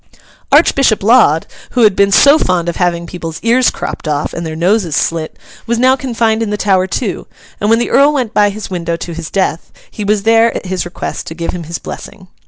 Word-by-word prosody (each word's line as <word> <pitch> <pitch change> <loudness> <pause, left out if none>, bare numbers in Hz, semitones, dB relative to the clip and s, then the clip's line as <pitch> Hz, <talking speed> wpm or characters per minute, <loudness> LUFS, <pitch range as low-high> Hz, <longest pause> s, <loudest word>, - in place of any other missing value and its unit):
Archbishop 245 -7 +3
Laud, 205 - +4 0.3
who 240 - +5
had 210 -3 +4
been 200 0 +3
so 285 +8 +6
fond 175 -2 0
of 170 - -3
having 170 -1 0
people's 165 -2 -7
ears 240 +2 +3
cropped - - -6
off 150 -1 -2
and 170 - -5
their 155 - -5
noses 175 -1 0
slit, 165 -1 -2 0.3
was 235 0 0
now 255 +2 +4
confined 230 -4 -1
in 225 - -1
the 210 - -2
Tower 190 -3 +1
too; 190 +1 -4 0.3
and 205 - 0
when 225 - +4
the 240 - -2
Earl 280 +2 +5
went 255 -7 -2
by 205 0 +3
his 205 +1 -6
window 170 -2 -2
to 170 0 -7
his 165 -1 -6
death, 185 -4 -2 0.2
he 210 - -6
was 205 0 0
there, 225 +1 +3
at - - -5
his 185 -1 -3
request, 175 - -6
to 160 - -7
give 170 0 -3
him 175 -2 -7
his 170 +1 -5
blessing. - - -10
195 Hz, 220 wpm, -14 LUFS, 170-230 Hz, 0.3 s, so